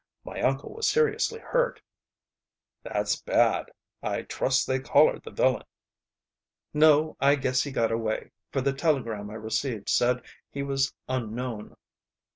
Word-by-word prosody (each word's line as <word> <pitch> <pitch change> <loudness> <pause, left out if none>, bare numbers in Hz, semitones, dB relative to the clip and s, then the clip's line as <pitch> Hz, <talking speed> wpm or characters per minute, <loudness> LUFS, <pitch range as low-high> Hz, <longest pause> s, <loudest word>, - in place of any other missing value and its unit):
My - - -6
uncle 135 +1 0
was 450 0 -1
seriously 455 0 +1
hurt." - - 0 1.0
"That's - - -1
bad. - - +2 0.3
I - - -2
trust 130 0 +1
they 130 0 0
collared 145 +3 +4
the - - -8
villain." - - +1 1.1
"No; 155 0 +5
I 140 +1 +5
guess 130 -2 +1
he 145 - -3
got 115 -3 +1
away, 115 -1 -2 0.2
for 135 - 0
the 135 +1 +1
telegram 120 -9 -1
I 105 - -8
received 110 0 -3
said 125 0 +2 0.3
he 140 - -4
was 135 -1 0 0.2
unknown." 120 -2 -4
135 Hz, 135 wpm, -27 LUFS, 115-150 Hz, 1.1 s, No